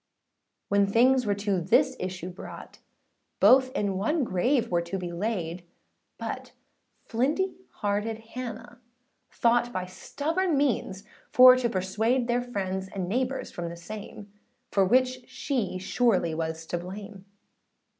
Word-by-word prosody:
When 200 0 +3
things 250 +3 +4
were 205 - +2
to 200 -2 -1
this 170 - +3
issue 185 -1 -4
brought, 180 - -10 0.6
Both 255 +6 +6
in 200 -7 -1
one 290 +9 +1
grave 235 +5 +1
were 175 -1 +2
to 170 +3 -4
be 180 -2 -5
laid: 175 -2 -3 0.5
But - - -6 0.5
flinty 300 +11 0 0.2
hearted 210 +2 -2 0.2
Hannah 240 -1 -7 0.5
thought, 240 +1 +2
By 185 -5 -3
stubborn 315 - -1
means 235 -8 0 0.3
for 255 0 +9
to 250 -2 0
persuade, 220 +6 0
Their 245 0 +1
friends 190 -6 -3
and 190 -2 -4
neighbours 255 +6 -2
from 170 -1 -5
the 170 - -8
same, 205 +2 -9 0.4
For 195 - +3
which 255 +4 +2
she 240 -10 -2
surely 190 -3 +1
was 160 0 -3
to 175 - -3
blame. 195 +2 -9
210 Hz, 135 wpm, -27 LUFS, 185-250 Hz, 0.6 s, for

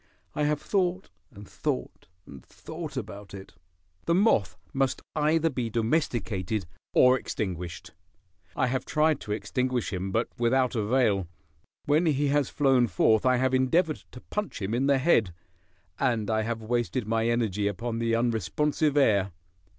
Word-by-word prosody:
I 150 - 0
have 150 0 +1
thought, 185 0 -1 0.2
and 105 -6 -13
thought, 65 - -4 0.2
and 65 -3 -12
thought 160 -3 -8
about 100 -4 -7
it. 95 0 -11 0.5
The 170 - +2
moth 185 - +2 0.2
must 135 -1 0
either 155 +2 +2
be 125 -3 -2
domesticated 110 - -1 0.3
or 130 0 +6
extinguished. 90 -4 -5 0.6
I - - +2
have 130 +1 -1
tried 155 -1 +1
to 105 - -7
extinguish 125 +2 -1
him, 95 +1 -3
but 115 +4 0
without 125 +2 +2
avail. 110 -4 +1 0.6
When 155 +4 +3
he 145 -1 +1
has 145 -2 +1
flown 135 -4 +3
forth 110 +5 +3
I 130 - +4
have 130 +1 +1
endeavored 155 +5 +2 0.2
to 125 - -10
punch 210 - -4
him 100 +2 -3
in 130 +3 +1
the 140 -1 +4
head, 115 - +2 0.6
and 115 -5 0
I 110 0 +1
have 115 0 -3
wasted 120 +1 -1
my 115 +1 0
energy 110 -4 0
upon 115 +4 -3
the 115 0 +1
unresponsive 135 - 0
air. 100 -8 +3
120 Hz, 150 wpm, -27 LUFS, 105-145 Hz, 0.6 s, or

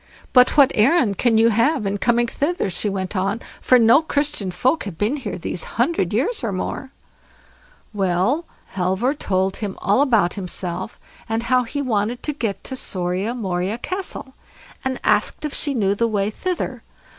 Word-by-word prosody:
"But 250 +3 +5
what 280 -3 +7
errand 225 - +3
can 235 -3 +3
you 225 +1 +5
have 230 +3 +2
in 200 +1 -1
coming 240 +1 +2
hither?" 290 - -1
she 205 - -1
went 190 0 -3
on, 195 +4 0 0.2
"for 255 - +5
no 235 +5 +6
Christian 285 - -1
folk 255 - 0
have 190 -6 -6
been 220 - 0
here 215 -9 -5
these 175 0 -4
hundred 240 - +1
years 275 - 0
and 200 -5 -1
more." 260 +7 -4 1.0
Well, 195 - +1 0.3
Halvor 190 +8 0
told 190 -8 -1
her 205 -3 -4
all 205 +7 +2
about 225 -11 +3
himself, 185 0 -5 0.3
and 225 +1 -1
how 250 +1 +2
he 285 +5 -3
wanted 230 -1 -1
to 300 - -1
get 220 -8 -3
to 260 - -5
SORIA 185 +1 -2
MORIA 190 -1 -2
CASTLE, 365 -3 -5 0.5
and 265 -1 -2
asked 210 +7 +1
if 300 - -4
she 285 -2 -2
knew 200 -4 +2
the 230 +3 +1
way 205 -2 0
thither. 365 +10 -3
225 Hz, 170 wpm, -21 LUFS, 195-265 Hz, 1.0 s, what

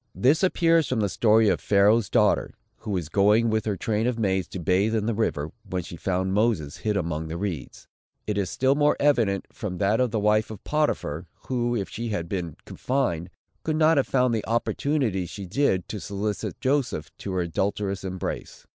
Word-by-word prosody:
This 140 +6 +3
appears 165 -4 +3
from 125 - -1
the 105 - +2
story 110 +2 +4
of - - +2
Pharaoh's 105 +2 +3
daughter, - - +2 0.2
who 110 - -9
was 90 -6 -1
going 105 +6 +3
with 110 0 0
her 105 -3 -1
train 110 +3 0
of 125 -2 -1
maids 95 -4 0
to 95 - -7
bathe 95 +6 +2
in 105 -2 0
the 115 - 0
river, 80 -9 -1
when 90 -1 -3
she 85 - -8
found 95 +2 -1
Moses 100 -9 +1
hid 105 -2 -1
among 80 -3 -2
the 80 +1 -4
reeds. 85 -9 -5 0.4
It 105 - -2
is 100 -3 -1
still 130 +7 +2
more 145 +1 +2
evident, 115 -10 +2
from 95 -4 -5
that 105 +3 +2
of 125 -1 +2
the 110 0 -1
wife 105 +1 +2
of 105 -2 -9
Potiphar, 95 - -1 0.2
who, 120 -2 0
if 100 -4 -2
she 115 +1 -5
had 90 -6 -2
been 85 -4 -4
confined, 110 -11 -1 0.3
could 155 - -1
not 160 0 +4
have 135 - +2
found 125 -2 +2
the 110 -2 -2
opportunities 115 - 0
she 100 - -7
did, 95 -2 +1
to 105 - -4
solicit 100 +1 -4
Joseph 130 - -1
to 100 - -5
her 90 - 0
adulterous 95 +3 -2
embrace. 95 -1 -5
105 Hz, 200 wpm, -25 LUFS, 95-120 Hz, 0.4 s, story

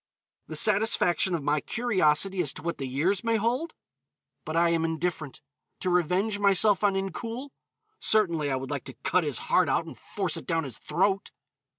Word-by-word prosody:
The - - -7
satisfaction 195 -4 +2
of 160 - -4
my 150 +1 +1
curiosity 195 -6 +1
as 150 -6 -1
to - - -7
what 170 0 -3
the 135 - -3
years 170 +10 0
may 230 0 +1
hold? 245 +9 -1 0.7
But 160 +1 -3
I 170 0 +4
am 165 -1 +1
indifferent. 160 -3 -3 0.4
To 185 - 0
revenge 180 +5 +1
myself 200 0 +4
on 200 -2 +3
Incoul. 230 - -4 0.5
Certainly, 170 - +2
I 135 - 0
would 130 +2 -5
like 140 -3 -4
to 130 -2 -8
cut 185 - +2
his 145 -3 0
heart 180 -5 +2
out 160 - +1
and 165 - -9
force 190 -6 -3
it - - -9
down 165 -2 0
his 135 -4 -8
throat! 195 +2 0
180 Hz, 185 wpm, -27 LUFS, 155-205 Hz, 0.7 s, I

